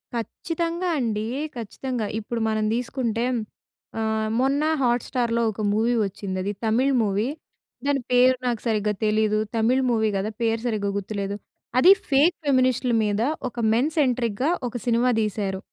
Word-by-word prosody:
ఖచ్చితంగా 335 +8 -3
అండి. 215 -4 -1 0.3
ఖచ్చితంగా. 235 +1 -4 0.2
ఇప్పుడు 230 +2 -4
మనం 215 0 0
తీసుకుంటే 235 -1 -1 0.7
ఆహ్, 220 0 0
మొన్న 275 +3 +2 0.2
హాట్‌స్టా‌ర్‌లో 240 -1 +1
ఒక 215 - -7
మూవీ 225 +3 +2
వచ్చింది 195 -1 -5
అది 200 - -1
తమిళ్ 245 +5 +2
మూవీ. 205 +2 0 0.6
దాని 285 -1 +1
పేరు 250 +1 +5
నాకు 235 -3 -1
సరిగ్గా 210 -2 +1
తెలీదు. 215 0 +2 0.2
తమిళ్ 235 +4 +2
మూవీ 220 -2 +2
గదా! 200 +3 -2
పేరు 225 0 +1
సరిగ్గా 210 -3 -1
గుర్తులేదు. 200 0 -3 0.4
అది 355 +8 +8 0.2
ఫేక్ 295 +6 +4
ఫెమినిస్ట్‌లు 255 -2 +2
మీద 210 0 0 0.3
ఒక 245 - -24 0.2
మెన్ 255 +7 +2
సెంట్రిక్‌గా 250 -2 +1 0.2
ఒక - - -17
సినిమా 240 +1 +2
తీశారు. 200 -2 -2
230 Hz, 135 wpm, -24 LUFS, 215-255 Hz, 0.7 s, అది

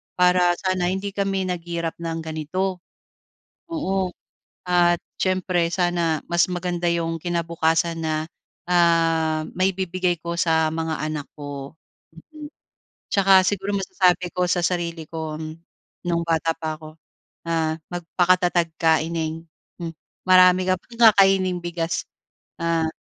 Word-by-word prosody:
para 180 -1 +4
sana 185 -2 0
hindi 195 +1 -3
kami 195 -1 0
naghirap 170 -2 -3
ng 165 -1 -3
ganito. 170 +4 -3 0.9
Oo, 195 - -1 0.6
at 175 -1 +4 0.2
siyempre, 185 -2 +1
sana 175 -3 0
mas 170 0 +4
maganda 175 -1 -2
yung 165 -1 -1
kinabukasan 165 -1 0
na, 155 0 -1 0.4
ah, 165 -2 +3
maibibigay 185 -2 0
ko 170 0 -3
sa 160 -2 +3
mga 160 0 -2 0.2
anak 150 -2 -4
ko. 145 0 -7 0.6
Mm, 300 -1 -8 0.6
tsaka 195 -2 +6
siguro 200 0 -1
masasabi 185 -2 +2
ko 180 0 +1
sa 175 0 +1
sarili 170 -2 -1
ko, 160 -2 -5 0.7
nung 170 -1 0
bata 165 0 +1
pa 160 -1 -4
ako, 155 0 -11 0.5
ah, 160 -1 0 0.2
"Magpakatatag 175 0 +2
ka 160 -1 +4
ineng, 165 0 -3 0.4
hmm, 165 -1 -4 0.3
marami 185 0 +6
ka 185 - +3
pang 235 0 -14
kakaining 190 -2 +3
bigas, 170 -1 -2 0.6
ah, 165 -1 +1
175 Hz, 120 wpm, -23 LUFS, 165-185 Hz, 0.9 s, tsaka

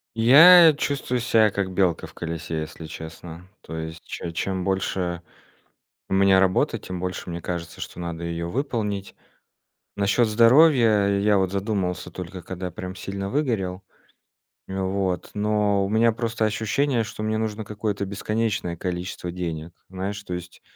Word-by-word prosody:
Я 160 +9 +9
чувствую 140 -3 -2
себя 110 -3 +3
как 95 -1 -2
белка 90 -3 +1
в - - -17
колесе, 80 -1 -4
если 80 +1 -8
честно. 80 +2 -9
То 80 - -8
есть 80 +1 -6
че 85 - -6
чем 95 +2 -2
больше 95 -2 -1 0.9
у - - -2
меня 95 0 +5
работы, 95 -1 +2
тем 90 -1 -6
больше 90 0 -4
мне 85 0 -5
кажется, 85 -2 -5
что - - -7
надо 85 -1 -5
её 85 0 -3
выполнить. 105 -5 -3 0.8
Насчёт 100 +4 +2
здоровья 115 -2 +5
я 105 0 +3
вот 95 -1 +1
задумался, 100 -2 -2
только 90 0 -7
когда 90 0 -6
прям 90 +2 -7
сильно 100 +1 -5
выгорел. 100 -9 -1 0.9
Н, 95 0 -3
вот. 95 -1 -2
Но 105 -1 +1
у - - -4
меня 115 +2 +3
просто 115 0 -2
ощущение, 115 +4 0
что 110 0 -7
мне 110 0 -1
нужно 110 0 -3
какое-то 105 -1 -3
бесконечное 105 -2 -2
количество 90 0 -4
денег. 85 -2 -5 0.2
Знаешь? 95 +2 -5
То 90 - -5
есть 90 0 -8
95 Hz, 150 wpm, -24 LUFS, 90-110 Hz, 0.9 s, Я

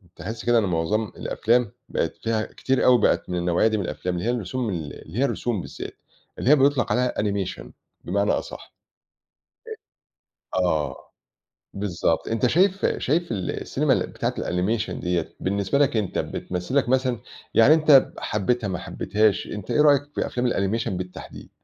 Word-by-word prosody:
تِحس 110 +4 -6
كده 120 -1 +4
إن - - +1
معظم 95 +4 0
الأفلام 120 -1 +1 0.2
بقت - - -1
فيها 115 -1 -1
كتير 135 -1 -1
أوي 125 -3 +6
بقت - - +2
من 90 - -2
النَوعيّة 85 +3 +2
دي 110 -1 +1
من 100 - -1
الأفلام، 90 +1 -3
اللي 90 - -3
هي - - +3
الرسوم 120 +1 -2
ال 80 -6 -4
اللي 90 +10 -5
هي - - +3
الرسُوم 120 -7 -2
بالذات، - - -8 0.4
اللي - - 0
هي 150 - +8
بيطلق 140 -2 +2
عليها 125 0 +1
animation 100 - -2 0.4
بمعنى 100 +3 +1
أصح. - - -5 1.8
أ - - +1
آه، 80 -4 0 0.8
بالضبط 90 -4 -1
أنت 115 +2 +1
شايف 190 +7 +2
شايف 165 +4 0
ال 95 -5 -2
السينما - - +1
بتاعة - - -3
الanimation 105 +6 -1
ديّة، 90 -2 -2
بالنسبة 100 +5 0
لك 140 -5 +2
أنت 105 -4 -1
بتْمثِل 90 +7 -4
لك 140 -3 +2
مثلًا، 130 -2 +1 0.3
يعني 125 +7 +7
أنت 155 -4 +5
حبيتها 110 +2 -1
ما 95 -2 -2
حبيتهاش 105 +2 0
أنت 105 -3 -6
إيه 150 - +3
رأيك 145 -2 +6
في - - 0
أفلام 125 0 -1
الanimation 110 +4 0
بالتحديد؟ 90 -2 -7
110 Hz, 165 wpm, -24 LUFS, 95-125 Hz, 1.8 s, هي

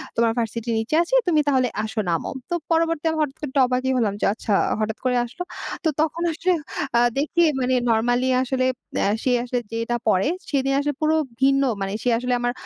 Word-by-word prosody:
তোমার 230 0 +3
ভার্সিটির 230 +1 -2
নিচে 225 +7 -1
আছি, 345 - -9
তুমি 315 -3 +3
তাহলে 260 -3 +3 0.2
আসো 215 0 -4
নামো।" 165 -2 -1 0.2
তো - - -2 0.2
পরবর্তী 330 -1 +1
আমি 320 - -2
হঠাৎ 295 -1 -1
করে 300 - -4
আমি - - -6
একটু 275 - +1
অবাকই 255 +1 0
হলাম 215 -5 +1
যে, - - +2
আচ্ছা 220 0 -5 0.3
হঠাৎ 215 0 -2
করে 250 -1 +2
আসলো। 245 +9 -7 0.4
তো - - +1
তখন 320 +2 -1
আসলে 350 +3 0 0.5
আ - - +5 0.2
দেখি 310 +4 +1 0.2
মানে 255 0 +1 0.2
নরমালি 245 +3 +2
আসলে 255 0 0 0.3
এ্যা 200 - +2
সে 255 - +2
আসলে 245 0 -1
যেটা 230 +1 -2
পরে, 195 +2 +3 0.2
সেদিন 275 -1 +1
আসলে 290 +1 -1
পুরো 310 +1 +3 0.3
ভিন্ন 275 +1 +4 0.2
মানে 195 - -2
সে 250 - +2
আসলে 250 0 -1
আমার 245 0 +1
255 Hz, 205 wpm, -23 LUFS, 230-295 Hz, 0.5 s, আ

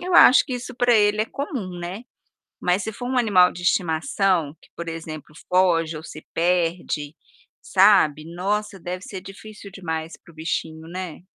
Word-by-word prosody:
eu 365 +1 -4
acho 250 - +8
que 255 - -4
isso 250 0 -6
pra 245 -1 +3
ele 210 0 +3
é - - +2
comum, 225 - -5
né. 180 +6 -6 0.6
Mas 180 +3 +1
se 220 - -4
for 245 +3 -7
um 260 - -1
animal 195 -7 +5
de 175 - -9
estimação, 175 - +1
que, - - -21
por 170 0 -6
exemplo, 155 -2 -7
foge 170 -3 +2
ou 155 - -7
se 155 - -10
perde, 165 -3 0 0.5
sabe, 155 -7 +4
nossa, 200 +1 -2
deve 180 +1 -5
ser 190 -1 -7
difícil 200 +1 -11
demais 160 -4 -5
para 170 - -19
o - - -23
bichinho, 160 0 -4
né. 180 -2 -6
180 Hz, 175 wpm, -23 LUFS, 165-210 Hz, 0.6 s, acho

